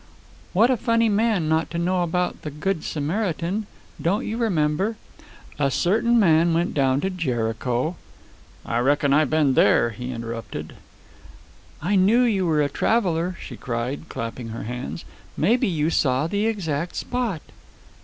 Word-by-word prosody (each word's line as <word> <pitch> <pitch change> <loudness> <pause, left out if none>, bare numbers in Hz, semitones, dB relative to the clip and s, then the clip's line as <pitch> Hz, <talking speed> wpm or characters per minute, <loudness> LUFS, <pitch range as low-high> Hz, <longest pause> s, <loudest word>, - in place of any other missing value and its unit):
"What 225 +7 +4
a 255 - +2
funny 230 -1 +2
man 210 -5 +1
not 160 +1 +1
to 170 - -4
know 180 +1 +1
about 180 +1 -1
the 150 - -5
good 155 +4 -2
Samaritan. 180 +5 -2 0.3
Don't 190 +5 0
you 220 - -3
remember? 195 -1 0 0.6
A 140 -1 +2
certain 230 - +2
man 165 -3 +4
went 170 +2 0
down 135 -1 +2
to 190 - -1
Jericho 125 -1 -1 0.3
" - - -27
"I 115 - -1
reckon 140 +2 +2
I've 150 -1 +3
been 155 -4 +3
there," 120 -2 +4
he 125 +4 -6
interrupted. 115 -1 -6 1.1
"I 195 +5 +1
knew 215 +7 +4
you 200 -7 +1
were 155 -2 +2
a - - +1
traveler!" 180 -2 0
she - - -8
cried, 125 +6 -4
clapping 115 +1 -5
her 115 0 -6
hands. 125 +7 -5 0.3
"Maybe 245 +3 +2
you 160 -3 0
saw 130 -1 +2
the 205 +6 0
exact 170 -7 -2
spot." 240 -10 -2
165 Hz, 155 wpm, -23 LUFS, 140-200 Hz, 1.1 s, What